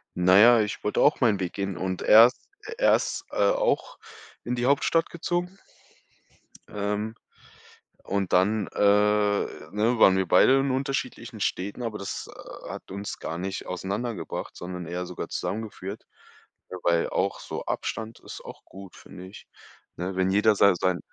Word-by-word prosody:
na 90 +1 +4
ja, 120 +2 +7
ich 105 - -4
wollte 105 - 0
auch 150 - +4
meinen 110 -6 +2
Weg 90 -2 -3
gehen 100 -1 -3
und 95 0 -3
er 115 +2 +9
ist, 125 - -10 0.2
äh 450 - -5
er - - +5
ist - - -3
auch - - +1 0.5
in 120 - -3
die 120 0 -1
Hauptstadt 145 +4 +2
gezogen. 175 +2 -3 1.1
Ähm, 105 +2 -3 0.9
und 100 -1 -2
dann, 100 +3 +2
äh, - - -9
ne, 105 +2 +1
waren 95 - +6
wir 95 -1 0
beide 135 +9 +5
in 135 -1 0
unterschiedlichen 135 +1 -3
Städten, 100 +6 -2
aber 115 -3 -4
das, 100 - -6
äh, - - -11
hat - - -9
uns 100 +1 -6
gar 80 +1 -5
nicht 95 +1 -5
auseinander 100 +6 -3
gebracht, - - -6
sondern 90 -1 -7
eher 90 +2 -4
sogar 90 0 -6
zusammengeführt. 105 -1 -5 0.6
W - - -7
weil 85 -1 +2
auch - - -1
so - - -6
Abstand 110 0 -4
ist - - -10
auch - - -11
gut, 95 -1 -13
finde 90 - -12
ich, 100 - -13 0.5
ne, 90 +2 -4
wenn 95 0 +1
jeder 105 +2 +4
sa 100 -1 +5
sein 90 0 0
100 Hz, 165 wpm, -26 LUFS, 95-115 Hz, 1.1 s, er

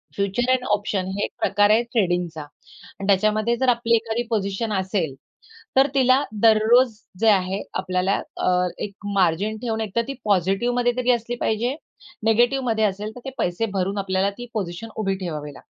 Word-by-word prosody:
Future 200 +6 0
and 255 -1 +2
option 200 -2 -1
हे 205 - -1
एक - - -3
प्रकार 205 0 +3
आहे 220 +2 +5
ट्रेडिंगचा 175 -7 0
आणि 150 +6 -12
त्याच्यामध्ये 215 +4 +2
जर 260 +1 +2
आपली 235 -1 +3
एखादी 225 +1 -1
पोझिशन 210 0 -1
असेल, 190 -6 -1 0.6
तर 270 +1 +6
तिला 260 +1 +4 0.2
दररोज 225 +2 +5 0.3
जे 225 - +2
आहे 190 -1 +2
आपल्याला 185 +1 0 0.2
अ, 180 0 +2
एक 200 - -4 0.2
मार्जिन 195 +4 +1
ठेवून 225 -2 -2
एकतर 220 +2 -1
ती 275 - -3
पॉझिटिव्हमध्ये 215 +6 +1
तरी 250 0 +2
असली 240 0 -1
पाहिजे, 235 +5 0 0.5
निगेटिव्हमध्ये 235 0 +2
असेल, 210 +2 -2
तर - - -8
ते - - -3
पैसे 175 +6 0
भरून 195 +2 -1
आपल्याला 195 0 0
ती 245 - -7
पोझिशन 190 +2 -4
उभी 195 -3 0
ठेवावी 150 -5 -5
लागते. - - -15
215 Hz, 165 wpm, -23 LUFS, 190-235 Hz, 0.6 s, तर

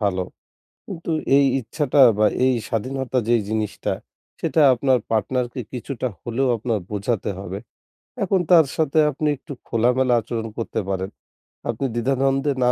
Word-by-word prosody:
ভালো। 95 -3 0 0.6
কিন্তু 170 -3 -6 0.3
এই 140 - +5 0.2
ইচ্ছাটা 145 +3 -1 0.2
বা 105 - +5 0.2
এই 130 0 +4
স্বাধীনতা 130 +3 -2
যেই 120 -1 +4
জিনিসটা, 110 -1 -2 0.5
সেটা 160 - +1
আপনার 130 +1 +2
পার্টনারকে 120 +3 -1
কিছুটা 130 +1 -4
হলেও 125 +3 -1
আপনার 115 0 -1
বোঝাতে 105 0 -1
হবে। 95 0 -5 0.6
এখন 195 -1 +2
তার 165 -4 +7
সাথে 155 -1 +1
আপনি 150 +2 -1
একটু 145 +3 -10 0.2
খোলামেলা 125 +2 +2
আচরণ 115 0 -4
করতে 115 -1 -2
পারেন। 95 0 -2 0.6
আপনি 120 +3 -1
দ্বিধা-দ্বন্দ্বে 135 +3 +1
না 125 - +4
125 Hz, 135 wpm, -22 LUFS, 110-135 Hz, 0.6 s, তার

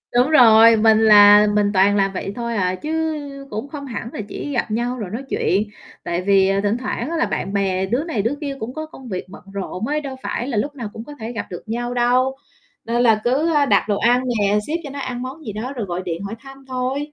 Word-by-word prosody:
đúng 250 +4 +4
rồi, 230 -5 +7
mình 220 0 +4
là 210 -1 +7
mình 205 -1 +2
toàn 195 +2 +4
làm 195 -1 +1
vậy 195 +1 -4
thôi 235 -1 -3
à, 185 -3 0
chứ 305 +11 -5 0.6
cũng 215 +6 -5
không 285 -2 -7
hẳn 230 -3 -6
là - - -4
chỉ 290 - -5
gặp 235 - -1
nhau 240 +3 -1
rồi 210 -6 -5
nói 235 +7 -5
chuyện. 195 +3 +1 0.4
Tại 175 +1 -2
vì, 195 0 +3
à, 195 0 +1
thỉnh 205 +3 +1
thoảng 250 +1 -4
á 335 - -2
là - - +2
bạn 195 - -3
bè 190 -1 0
đứa 245 +10 -1
này 290 -11 -2
đứa 230 +7 -1
kia 280 -2 -4
cũng 235 +4 -5
có 310 0 -5
công 265 -5 -12
việc 185 -2 -4
bận 195 - -12
rộn 200 +2 -4
ấy, 300 +1 -1
đâu 270 -2 -6
phải 240 - -3
là 250 -6 -2
lúc 285 +7 -2
nào 235 -6 -5
cũng 220 - -7
có 295 - -10
thể 225 +2 -5
gặp 230 - -4
được 175 - -7
nhau 240 +2 -3
đâu, 250 +2 +2 0.5
nên 235 +1 0
là 220 -3 +4
cứ, 285 +7 +1
a, 290 -1 +4
đặt - - +3
đồ 205 - +1
ăn 245 +2 +3 0.2
nè, 205 +1 +2
ship 330 +3 -1
cho 290 - -7
nó 280 +1 -7
ăn 250 -2 -4
món 265 +5 -7
gì 215 - -6
đó 240 +6 -5
rồi 235 -5 -4
gọi 180 -1 -4
điện 170 +2 -4
hỏi 200 +3 -5
thăm 270 +2 -14
thôi. 255 +1 -2
230 Hz, 260 wpm, -20 LUFS, 205-265 Hz, 0.6 s, rồi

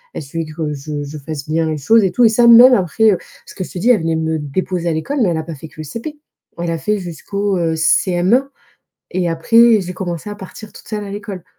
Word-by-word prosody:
elle - - -5
suivait 165 +4 -5
que 155 -1 -4
je 145 +1 -5
je 145 +2 -8
fasse 145 0 -7
bien 160 +1 0
les 155 - -2
choses 220 +10 +3
et 190 - +1
tout 245 - +3
et - - +6
ça 235 +2 +3
même 240 +2 +9
après, 215 +2 +3
heu 190 - +1 0.3
parce - - -13
que 185 - -4
je - - -10
te - - -8
dis 230 +8 +3
elle 220 - +3
venait 165 0 -1
me 160 0 -1
déposer 170 +4 -2
à - - 0
l'école, 265 - -2
mais 205 - +3
elle 165 - -1
a 160 - -3
pas 165 0 -7
fait 155 +3 -11
que - - -22
le 155 - -6
CP. 235 - -7 0.4
Elle 170 0 -2
a 165 - -1
fait 210 +6 -1
jusqu'au, 195 +3 -3
heu, 165 -2 0
CM1. 180 +9 +2 0.6
Et 180 -1 -1
après 230 +7 +4
j'ai 180 0 -6
commencé 175 0 -5
à 205 - -6
partir 205 +2 -11
toute - - -14
seule 210 -2 -4
à - - -8
l'école. 200 -3 -7
180 Hz, 265 wpm, -17 LUFS, 160-210 Hz, 0.6 s, même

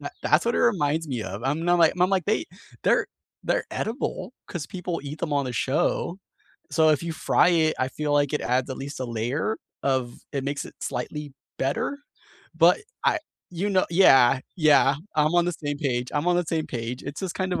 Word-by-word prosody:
Tha - - -5
that's - - +3
what 235 - +1
it - - +1
reminds 160 -7 +1
me 125 -5 -2
of, 95 +3 -6
I'm 150 +5 -1
not, 175 0 +3
like 165 -2 +5
I'm 180 +2 +4
like, 190 -3 +1
they 215 - +1 0.4
they're - - +3 0.4
they're - - 0
edible 235 +2 -3
'cause 165 -6 -5
people 180 -2 -4
eat 145 +2 -7
them 155 - -3
on 140 -1 +1
the 125 - -4
show. 150 +8 0 0.5
So, 160 -1 +4
if 150 0 +2
you 165 -1 -3
fry 160 - +3
it, 160 -2 +3
I 130 - 0
feel 150 +3 -3
like 145 -1 +2
it - - -1
adds 125 +1 0
at 130 - -4
least 140 0 -6
a 130 - -2
layer 120 - -1 0.3
of 130 -3 0 0.2
it 135 -1 -2
makes 140 0 -2
it - - -13
slightly 150 -2 -4 0.3
better, 140 - -1 0.6
but - - +6 0.3
I - - +3 0.3
you 180 +4 -2
kno 185 -1 +2
Yeah, 135 -8 +6 0.2
yeah, 145 -4 +5 0.2
I'm 155 +2 +3
on 175 -1 +4
the 175 - 0
same 145 -3 -4
page, 125 -4 -1
I'm 145 +3 -1
on 175 - +3
the 175 - +1
same 160 -1 -1
page, 120 0 -5
it's 140 +1 -6
just 190 -3 -4
kind 185 -1 -2
of - - -1
150 Hz, 215 wpm, -25 LUFS, 135-175 Hz, 0.6 s, but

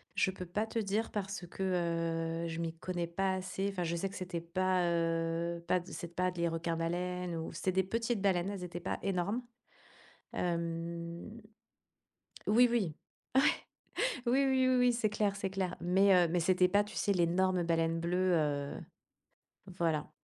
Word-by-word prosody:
Je - - +3
peux 185 -1 -7
pas 210 +5 -1
te 225 - -3
dire 215 +1 0
parce 195 -2 -3
que, 175 - -7 0.8
heu, - - -2
je 165 0 -4
m'y 165 -1 -2
connais 175 0 -3
pas 190 +3 0
assez. 190 +1 -2
Enfin, 185 -3 -2
je 170 0 -1
sais 195 +3 -1
que 195 - -10
c'était 180 -2 -4
pas, 185 +2 +1
heu, 165 0 0
pas 180 - +3
de 175 - -13
c'était 170 0 -6
pas 185 +1 +1
des 170 -1 0
requins 165 0 -2
baleines 175 +1 -2
ou 160 0 -4
c'est 185 - -1
des 190 +1 +3
petites 230 +2 -1
baleines. 190 -1 +2
Elles 195 -3 -5
étaient 175 0 -6
pas 175 - -2
énormes. 195 +5 0 0.9
Hem. 170 +3 -3 1.1
Oui, 240 +4 +6
oui. 205 -10 0 1.3
Ouais. 240 - +2
Oui, 275 +2 +4
oui, 260 -1 +3
oui, 255 - +4
oui. 250 0 +4
C'est 230 -2 +1
clair 205 -1 0
c'est 200 -1 -2
clair, 190 -2 -2
mais 190 +3 +4
heu, 175 -1 +5
mais 175 +2 +1
c'était 180 +2 +4
pas 205 +2 +4
tu 210 +1 -11
sais? 200 - +1
L'énorme 180 +1 +2
baleine 165 0 +1
bleue, 180 +2 +1
heu, 145 -3 0 1.0
voilà, 160 -3 0
180 Hz, 180 wpm, -33 LUFS, 170-195 Hz, 1.3 s, Oui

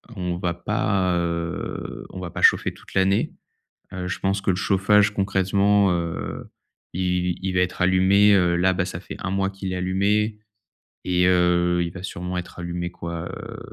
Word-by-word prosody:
on 90 -2 -3
va 90 -1 -1
pas, 95 0 0
heu, 85 -1 -4
on - - -8
va 90 -1 -5
pas - - -6
chauffer - - +4
toute - - -16
l'année. 95 +1 +2 0.6
Heu, 90 -1 -4
je 90 - -4
pense 95 +1 0
que 95 - -1
le 90 - +3
chauffage, 100 +2 +3
concrètement, 100 0 +2
heu, 85 -1 -3 0.4
il 90 -1 0
il 95 - -1
va 90 - +2
être 90 0 -2
allumé, 95 +3 +5
heu, 90 -3 +3
là, 95 +2 +3
bah, 90 0 -1
ça 85 -2 -5
fait 85 - -9
1 90 - -3
mois 95 0 0
qu'il 95 -1 -5
est - - -2
allumé 100 +4 0 0.7
et 90 0 +2
heu, 90 -1 +3
il 85 - -3
va 90 - -9
sûrement 90 -1 -4
être 90 - -8
allumé, 85 0 -4
quoi? 85 -1 -6
Heu, - - -8
90 Hz, 185 wpm, -23 LUFS, 90-95 Hz, 0.7 s, allumé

